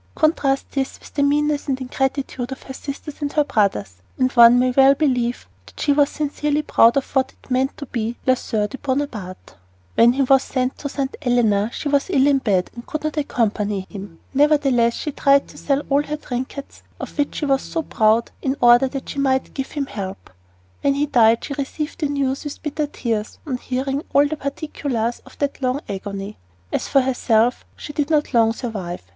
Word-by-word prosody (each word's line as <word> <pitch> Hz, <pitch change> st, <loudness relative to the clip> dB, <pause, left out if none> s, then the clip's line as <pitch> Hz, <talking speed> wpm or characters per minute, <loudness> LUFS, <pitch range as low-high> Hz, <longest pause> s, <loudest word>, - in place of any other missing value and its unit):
Contrast 285 Hz, -3 st, +1 dB
this 270 Hz, -1 st, -3 dB
with -, -, -15 dB
the 290 Hz, -, 0 dB
meanness 295 Hz, +1 st, +1 dB
and 265 Hz, -2 st, -1 dB
ingratitude 265 Hz, -1 st, -2 dB
of 265 Hz, -, -7 dB
her 265 Hz, -, -8 dB
sisters 285 Hz, +2 st, -7 dB
and 285 Hz, -1 st, -1 dB
her 300 Hz, -, +3 dB
brothers, 195 Hz, -, 0 dB, 0.2 s
and 255 Hz, 0 st, +2 dB
one 235 Hz, -1 st, +8 dB
may 255 Hz, 0 st, +3 dB
well 270 Hz, +2 st, +6 dB
believe 250 Hz, -, 0 dB, 0.2 s
that 100 Hz, -, -15 dB
she 285 Hz, -, +2 dB
was 285 Hz, 0 st, +3 dB
sincerely 295 Hz, 0 st, -1 dB
proud 235 Hz, -3 st, +4 dB
of 275 Hz, -, 0 dB
what 265 Hz, -1 st, +1 dB
it -, -, -21 dB
meant 260 Hz, +2 st, +1 dB
to 285 Hz, -, -6 dB
be 230 Hz, -2 st, -3 dB
la 260 Hz, -, +5 dB
soeur 215 Hz, -4 st, -1 dB
de 270 Hz, -, -9 dB
Bonaparte. 260 Hz, -10 st, -4 dB, 0.4 s
When 235 Hz, +1 st, +5 dB
he 270 Hz, +1 st, +1 dB
was 270 Hz, 0 st, +5 dB
sent 255 Hz, -1 st, -2 dB
to 285 Hz, -, -4 dB
St. 275 Hz, -1 st, -3 dB
Helena 225 Hz, -4 st, +2 dB
she 295 Hz, -, -5 dB
was 285 Hz, +3 st, +1 dB
ill 275 Hz, -7 st, +3 dB
in 280 Hz, -1 st, +4 dB
bed 190 Hz, -7 st, 0 dB
and 235 Hz, -, -9 dB
could 310 Hz, -1 st, -4 dB
not 310 Hz, 0 st, -2 dB
accompany 210 Hz, -8 st, 0 dB
him. 195 Hz, -5 st, -9 dB, 0.2 s
Nevertheless, 275 Hz, -5 st, +3 dB
she 300 Hz, -, -4 dB
tried 280 Hz, 0 st, +3 dB
to -, -, -14 dB
sell 280 Hz, 0 st, 0 dB
all 280 Hz, +1 st, +3 dB
her 295 Hz, +1 st, -4 dB
trinkets, 260 Hz, 0 st, -6 dB, 0.2 s
of -, -, -7 dB
which 290 Hz, -2 st, -1 dB
she 300 Hz, -, -2 dB
was 270 Hz, -1 st, +2 dB
so 325 Hz, -2 st, -3 dB
proud, 220 Hz, -3 st, +2 dB
in 270 Hz, -1 st, 0 dB
order 240 Hz, +2 st, +6 dB
that 265 Hz, 0 st, -6 dB
she 280 Hz, -, -4 dB
might 265 Hz, -1 st, +1 dB
give 270 Hz, -1 st, -4 dB
him 285 Hz, -2 st, -1 dB
help. 195 Hz, -, -7 dB, 0.5 s
When 280 Hz, -1 st, +2 dB
he 290 Hz, +1 st, +1 dB
died 230 Hz, -5 st, +4 dB
she 285 Hz, -, -4 dB
received 295 Hz, +4 st, -4 dB
the 300 Hz, -, 0 dB
news 275 Hz, -2 st, -1 dB
with 295 Hz, -1 st, -7 dB
bitter 300 Hz, 0 st, -2 dB
tears 225 Hz, -6 st, -3 dB
"on 265 Hz, -5 st, -2 dB
hearing 270 Hz, +3 st, -2 dB
all 285 Hz, +1 st, +5 dB
the 310 Hz, -, -3 dB
particulars 275 Hz, -5 st, -3 dB
of -, -, -16 dB
that 285 Hz, -1 st, -2 dB
long 255 Hz, +1 st, 0 dB
agony." 200 Hz, +1 st, -5 dB, 0.4 s
As -, -, -1 dB
for 275 Hz, -, +4 dB
herself, 245 Hz, -2 st, +1 dB
she 295 Hz, -, -8 dB
did 295 Hz, 0 st, -1 dB
not 300 Hz, -3 st, +1 dB
long 225 Hz, -2 st, +4 dB
survive. 200 Hz, -, -5 dB
265 Hz, 205 wpm, -21 LUFS, 235-285 Hz, 0.5 s, one